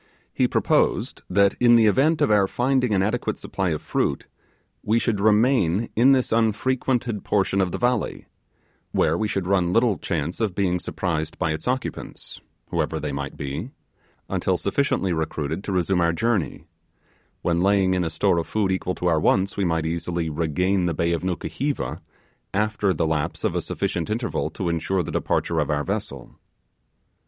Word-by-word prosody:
He - - +2
proposed - - +1
that 100 +1 +4
in 120 -1 +6
the 115 -1 +5
event 140 +9 +3
of - - +2
our 100 -2 +4
finding 125 +2 +1
an 95 - +2
adequate 110 0 -1
supply 95 -2 -2
of 75 -2 -3
fruit, - - -1 0.6
we 110 +2 +1
should 115 -3 0
remain 110 -2 +3
in 125 +5 +5
this 130 -2 +2
unfrequented 115 +1 0
portion 100 -1 +1
of 90 -2 0
the - - -3
country 125 -2 -1 0.7
where 80 +1 +2
we 105 +5 0
should 95 -3 -2
run 90 -2 +2
little 115 0 +2
chance 85 -1 -3
of 105 -5 -1
being 90 -3 +1
surprised 80 -3 -3
by 85 -4 0
its 80 +6 -5
occupants, 130 +1 -4 0.3
whoever - - -1
they - - -3
might 70 0 -5
be 70 0 -4 0.6
until - - 0
sufficiently 95 -10 0
recruited 80 +1 -3
to - - -3
resume 90 0 +1
our 85 0 +2
journey; 110 -1 -1 0.8
when 85 0 +1
laying 95 -1 +3
a 90 -2 0
store 85 +2 +1
of 85 - -4
food 105 -3 0
equal 95 -1 -1
to - - -5
our 80 -3 +3
wants, 95 +5 +2
we 100 - 0
might 80 -2 0
easily 85 0 -2
regain 90 +4 0
the 85 - -1
bay 85 +2 +1
of 85 - -1
Nukuheva, 125 - -3 0.5
after 105 -1 +1
the 85 -2 0
lapse 80 -2 -2
of - - 0
a - - 0
sufficient 85 +1 -3
interval 115 +2 -1
to 95 - -4
ensure 85 +3 0
the - - -6
departure 85 -1 0
of 75 - 0
our 75 -1 0
vessel. 100 - -5
95 Hz, 175 wpm, -24 LUFS, 85-110 Hz, 0.8 s, in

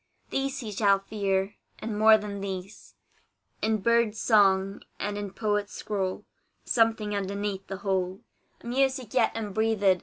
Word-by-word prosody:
These 270 0 -1
he 220 -3 -5
shall 200 -1 +3
hear, 195 -1 0 0.2
and 220 -1 -4
more 220 +1 +7
than 205 -2 -6
these 190 0 -7 0.7
In 215 -1 +1
bird's 235 -1 +2
song, 195 -3 +3 0.2
and 205 0 -2
in 205 -1 -4
poet's 205 0 -1
scroll; 190 -3 -3 0.4
Something 225 -3 +2
underneath 200 0 -3
the 195 - -5
whole, 190 -1 0 0.4
A - - -16
music 260 -1 0
yet 245 -3 +3
unbreathed. 210 -3 +1
205 Hz, 140 wpm, -27 LUFS, 195-225 Hz, 0.7 s, more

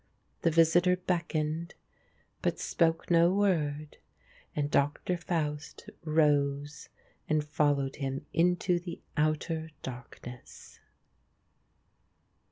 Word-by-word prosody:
The - - +3
visitor 165 +3 +4
beckoned, 170 -2 -2 0.7
but - - 0
spoke 165 0 0
no 170 +1 +6
word, 155 -7 0 0.6
and 145 0 -1
Doctor 145 +6 +1
Faust 160 -4 -3
rose 145 -2 +1 0.4
and 155 -1 +2
followed 145 -2 +1
him 135 -1 -3
into 175 +1 +2
the 175 -1 -7 0.2
outer 160 +1 0
darkness. 125 -1 -10
155 Hz, 85 wpm, -30 LUFS, 145-170 Hz, 0.7 s, no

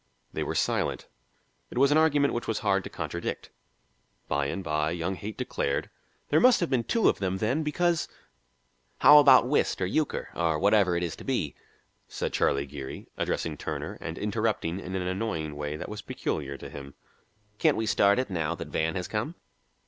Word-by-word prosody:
They - - -3
were - - -2
silent. - - 0 0.6
It - - -8
was 140 +2 +5
an 150 - +5
argument 145 -3 +3
which 120 - -3
was 110 - 0
hard 100 -1 +2
to - - -5
contradict. - - -5 0.8
By 70 0 0
and 95 +6 -4
by, 75 -1 0
young 85 +3 -2
Haight 105 +3 -7
declared, 70 - -2 0.4
"There 155 - +4
must 250 +3 +6
have 170 - -1
been 120 -3 +1
two 230 - +2
of - - +2
them 95 -1 -1
then, 120 +10 0
because 165 +2 +1 0.5
" - - -43
"How 150 0 +10
about 135 -4 +7
whist 145 - +1
or 95 - +1
euchre 150 +11 -1
or 80 -2 +1
whatever 100 0 +3
it 85 - -1
is 85 -3 -3
to - - -10
be?" - - -1 0.5
said - - -4
Charlie 70 +1 +1
Geary, 70 -1 -8
addressing 80 -2 -2
Turner - - -5
and 80 - -5
interrupting 105 -4 -1
in 95 -1 -6
an 95 - -1
annoying 90 -6 -2
way 75 0 -4
that 75 - -6
was 105 0 -6
peculiar 70 -2 -4
to - - -9
him. 70 -1 -9 0.6
"Can't - - +3
we 110 - 0
start 100 -1 +4
in 130 - +1
now 85 -4 -2
that - - -7
Van 80 +3 -1
has 90 -2 -3
come?" 115 +11 -3
95 Hz, 195 wpm, -28 LUFS, 80-125 Hz, 0.8 s, How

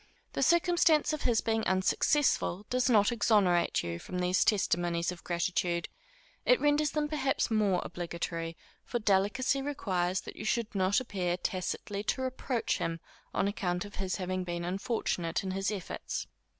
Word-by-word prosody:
The - - -2
circumstance 340 -3 +4
of 305 - -3
his 235 -3 +3
being 225 0 0
unsuccessful 190 +1 +2
does 255 +1 +2
not 210 -3 +5
exonerate 200 -7 +3
you 85 0 -4
from 180 - -6
these 180 0 +2
testimonies 175 -4 +1
of 180 - -10
gratitude; 170 0 -1 0.5
it - - +4
renders 295 0 +3
them 300 +1 -1
perhaps 275 -5 0
more 205 -4 +2
obligatory, 170 -1 -4 0.3
for 240 - -2
delicacy 215 +6 +2
requires 190 -10 -1
that - - -9
you - - -7
should 225 +1 -1
not 190 0 +2
appear 185 -8 -2
tacitly 190 +2 -3
to 260 - 0
reproach 260 -2 -1
him 165 0 -2 0.3
on - - +1
account 180 -3 -2
of 205 - -10
his 190 -1 -2
having 185 -1 -2
been 175 -1 -4
unfortunate 180 -3 -1
in 190 - -3
his 195 +1 -1
efforts. 215 - -4
195 Hz, 155 wpm, -30 LUFS, 180-245 Hz, 0.5 s, not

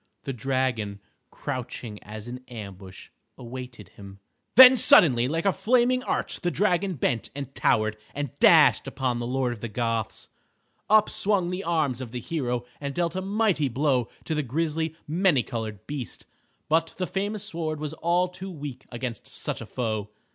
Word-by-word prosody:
The 135 - -4
dragon, 125 -5 -1 0.3
crouching 120 -3 -6
as 105 +1 -9
in 125 +1 -7
ambush, 100 -5 -10 0.3
awaited 125 -5 -9
him. 100 0 -12 0.4
Then 260 +2 +11
suddenly 125 - +6
like 165 +5 -2
a 195 - +4
flaming 250 +2 +2
arch - - -2
the 175 - +1
dragon 185 0 +1
bent 120 -4 -1
and 140 -2 -6
towered, 110 -4 +1 0.2
and 145 -3 -3
dashed - - +6
upon 125 -2 -1
the 120 - -3
Lord 125 -1 0
of 110 - -11
the 115 - -3
Goths. 115 0 -2 0.6
Up 215 0 +6
swung 195 -4 +1
the 180 +2 -3
arm 160 -5 +1
of 120 -3 -7
the 125 - -3
hero, 125 -3 -2
and 140 -1 -5
dealt 175 0 0
a 185 - -1
mighty 195 -7 +1
blow 130 -2 +1
to 160 - -3
the 150 - 0
grisly, 160 +4 -2
many 165 -4 +3
colored 110 -3 -5
beast. 145 -3 -6 0.4
But 165 +1 +1
the 185 - -1
famous 205 +2 -3
sword 165 -6 -3
was 150 0 -4
all 175 +3 +1
too 185 +1 -8
weak 145 -6 -8
against 120 -2 -5
such - - -3
a - - -8
foe. 110 -4 -3
135 Hz, 170 wpm, -26 LUFS, 120-175 Hz, 0.6 s, Then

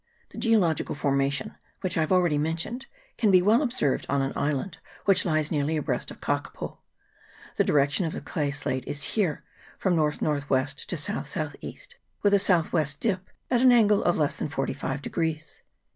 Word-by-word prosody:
The - - -9
geological 200 - +2
formation, 140 -1 0 0.2
which 185 - -1
I - - +1
have 155 - -1
already 175 -5 +3
mentioned, 170 - -3 0.3
can 220 -3 +3
be 185 -2 +7
well 220 +6 +4
observed 240 - 0
on 140 - +2
an 135 - -2
island 150 +5 -2 0.3
which 195 -1 +4
lies 155 -3 0
nearly 155 0 0
abreast 150 - -2
of - - -10
Kakapo. - - -3 0.8
The - - +4
direction 145 +4 +2
of 160 - -4
the - - -4
clay 145 -2 -2
slate 140 -2 -3
is 145 - -3
here 185 -9 0 0.3
from 185 -3 +1
north 150 -2 +1
north 145 -2 -1
west 135 +1 0
to - - -1
south - - -3
south - - -3
east, - - -10 0.3
with 205 -1 +4
a 200 - +6
south 180 -4 +2
west 150 -4 0
dip 190 -4 -1 0.2
at 245 -1 +3
an 255 -1 +7
angle 210 -4 +4
of 175 - +2
less 150 -3 0
than - - -3
forty 135 - -2
five 135 +1 -4
degrees. 160 -2 -3
155 Hz, 190 wpm, -26 LUFS, 145-195 Hz, 0.8 s, be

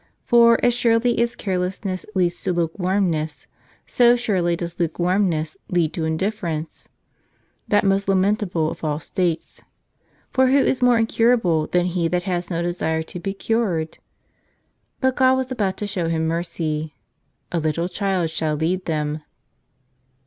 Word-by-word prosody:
For 235 -1 +6
as 245 - +4
surely 235 0 +2
as 235 0 0
carelessness 185 0 -3
leads 175 -2 0
to 185 - -1
lukewarmness, 170 -3 -1 0.4
so 240 -1 +4
surely 190 -8 0
does 170 0 -6
lukewarmness 175 -1 0
lead 170 -3 +1
to 165 -4 -2
indifference, 165 -1 -3 0.8
that 205 - +3
most 195 0 +1
lamentable 190 -4 +1
of - - -10
all 150 -1 -1
states. 170 +1 -2 0.7
For 260 0 +3
who 265 +2 +4
is 265 -1 +2
more 245 -1 +5
incurable 225 -8 +2
than 175 0 +1
he 175 -2 0
that 180 +1 -1
has 175 -1 -2
no 170 -1 -1
desire 160 -2 -1
to 175 - -8
be 195 +3 -4
cured? 195 -8 -1 1.0
But 260 -1 +1
God 260 -1 +5
was 260 0 -2
about 200 -7 -1
to 210 - -3
show 190 -4 -2
him 160 -1 0
mercy. 160 -2 -3 0.6
"A 170 - 0
little 160 +2 -1
child 185 -4 -1
shall 155 -1 -1
lead 175 +5 -1
them." 150 -1 -2
180 Hz, 145 wpm, -22 LUFS, 165-210 Hz, 1.0 s, For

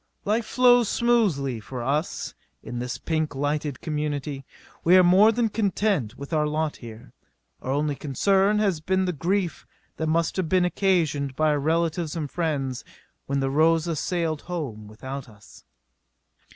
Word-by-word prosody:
Life 215 +2 0
flows 245 -2 +4
smoothly 185 - +1
for 120 +3 -7
us 145 +6 -2 0.3
in 120 +1 -5
this 125 0 -4
pink 155 -3 -2
lighted 145 0 -2
community. 150 -3 -3 0.4
We 180 +3 +6
are 185 - +7
more 190 +5 +6
than 230 0 0
content 200 - 0
with 140 +4 -8
our 150 -1 +2
lot 155 0 -1
here. 115 -1 -11 0.5
Our - - -6
only 145 +1 0
concern 195 +9 +2
has 195 -7 +1
been 190 +3 +1
the 180 - -1
grief 175 +3 -2 0.3
that 160 - -2
must 165 +2 0
have 180 -4 -1
been 185 0 +3
occasioned 160 -8 0
our 155 -2 +2
relatives 165 +1 0
and 150 -4 -4
friends 140 -7 -2 0.4
when 140 0 0
the 135 0 0
Rosa 160 +2 +2
sailed 165 -1 -1
home 140 -12 -5
without 130 +5 -7
us. 105 -2 -17
155 Hz, 150 wpm, -25 LUFS, 140-185 Hz, 0.5 s, are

